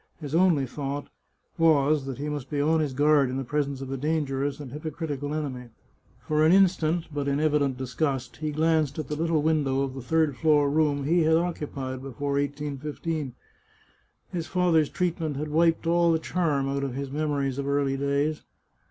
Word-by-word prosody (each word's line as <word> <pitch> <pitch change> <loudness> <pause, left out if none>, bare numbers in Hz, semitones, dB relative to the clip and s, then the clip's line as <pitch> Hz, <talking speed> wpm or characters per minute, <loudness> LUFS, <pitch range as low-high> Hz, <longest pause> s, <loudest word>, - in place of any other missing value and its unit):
His 150 -3 -7
only 165 -5 +4
thought 140 +2 -5 0.5
was 150 -3 +3
that 135 - -4
he 145 +2 -4
must 145 -3 -4
be 145 - -2
on 160 +3 +3
his 150 -3 0
guard 145 0 +3
in 130 - -3
the 135 - -2
presence 140 0 -2
of 135 -1 -6
a 135 - -2
dangerous 145 -1 -1
and 140 -4 -8
hypocritical 150 -1 -4
enemy. 135 -5 -4 0.6
For 155 0 +2
an 160 - +5
instant, 175 -3 +3
but 145 -1 -2
in 140 0 +1
evident 145 -4 +1
disgust, 130 0 -2
he 155 0 -3
glanced 155 -2 +1
at 155 -4 -4
the 150 - -2
little 160 -1 +1
window 145 -4 +1
of 135 -1 -3
the 135 - -6
third 155 +1 +1
floor 150 -2 +3
room 145 -2 +1
he 170 +5 +3
had 160 0 +4
occupied 140 -6 -3
before 135 +1 -4
1815. 145 0 -3 1.0
His 170 -3 -3
father's 175 -5 +2
treatment 165 -5 -2
had 150 +1 -3
wiped 165 +2 +2
all 170 0 +3
the 165 - +3
charm 155 -4 0
out 140 0 -1
of 135 -3 -3
his 140 0 -4
memories 140 -2 -1
of 140 - -3
early 140 -1 +1
days. 140 +2 0
145 Hz, 185 wpm, -26 LUFS, 140-160 Hz, 1.0 s, an